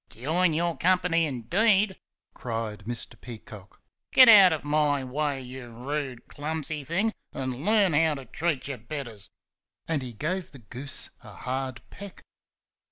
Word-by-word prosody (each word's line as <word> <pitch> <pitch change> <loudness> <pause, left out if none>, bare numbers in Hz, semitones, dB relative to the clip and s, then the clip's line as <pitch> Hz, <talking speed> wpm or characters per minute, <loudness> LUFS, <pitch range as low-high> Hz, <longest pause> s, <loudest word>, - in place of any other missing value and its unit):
"Join 160 +7 0
your 170 0 0
company, 180 -2 +2
indeed!" 190 - +2 0.4
cried 110 -4 -5
Mr. 120 0 -2
Peacock. 105 -4 -11 0.3
"Get 255 -1 +9
out 200 -5 +9
of 155 - -2
my 145 -2 +1
way, 140 +1 -2
you 125 -1 -9
rude, 130 +1 -5
clumsy 155 0 -4
thing, 190 +10 0 0.2
and 130 +1 -4
learn 205 -3 +3
how 155 0 +3
to 135 -2 -9
treat 150 +3 -2
your 135 -3 -5
betters!" 115 -4 -7 0.6
and 160 -3 0
he 125 -2 -7
gave 170 - -3
the - - -10
goose 125 +4 -2
a 110 - -12
hard 130 +2 -4
peck. 200 -2 -10
145 Hz, 145 wpm, -27 LUFS, 125-170 Hz, 0.6 s, Get